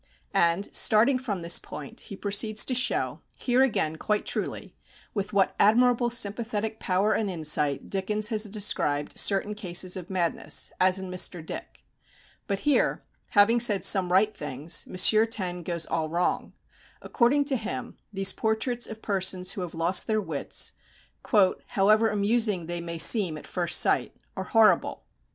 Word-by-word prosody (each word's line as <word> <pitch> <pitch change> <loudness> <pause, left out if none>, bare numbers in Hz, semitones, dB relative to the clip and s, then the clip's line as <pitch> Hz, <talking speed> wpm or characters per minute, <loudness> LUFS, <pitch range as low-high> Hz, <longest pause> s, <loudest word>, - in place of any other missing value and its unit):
And, 170 +4 +1
starting 235 +5 +4
from 205 -9 -5
this 170 +1 +3
point, 145 -2 -9
he 200 - -6
proceeds 210 +2 +1
to 260 - -1
show, 255 +1 0
here 250 0 +1
again 160 -12 0
quite 210 +5 -1
truly, - - -4 0.4
with 205 -1 -3
what 195 -2 +1
admirable 240 +3 +3
sympathetic 220 -1 -2
power 195 +3 0
and 215 -3 -1
insight 150 -5 -1
Dickens 210 +2 -2
has 215 -2 +1
described 195 -8 -1
certain 200 +1 +1
cases 185 -3 -1
of 180 -2 -8
madness, 175 -3 -1
as 185 0 +3
in 190 -1 -6
Mr. 180 -2 -2
Dick. - - -9 0.6
But 200 -1 -2
here, 295 -1 +1 0.3
having 225 +4 +5
said 210 -4 +3
some 185 -3 +3
right 205 +4 +3
things, 150 +3 -2
M. 215 +4 +4
Taine 185 -6 -4
goes 170 -1 -3
all 160 -1 -2
wrong. 175 +2 -2 0.5
According 280 +4 +1
to 275 -1 +1
him, 205 - -5 0.2
these 195 -1 +3
portraits 235 +2 -1
of 220 0 -10
persons 190 -2 0
who 195 - -5
have 175 -3 -6
lost 170 +3 0
their 215 -1 +1
wits, 160 -8 -2 0.9
"however 215 +3 +3
amusing 210 -3 0
they 175 +1 -5
may 170 0 -6
seem 170 -1 +4
at - - -11
first 175 -2 0
sight," - - +1 0.2
are - - -5
"horrible." 225 -2 +2
200 Hz, 155 wpm, -26 LUFS, 175-220 Hz, 0.9 s, having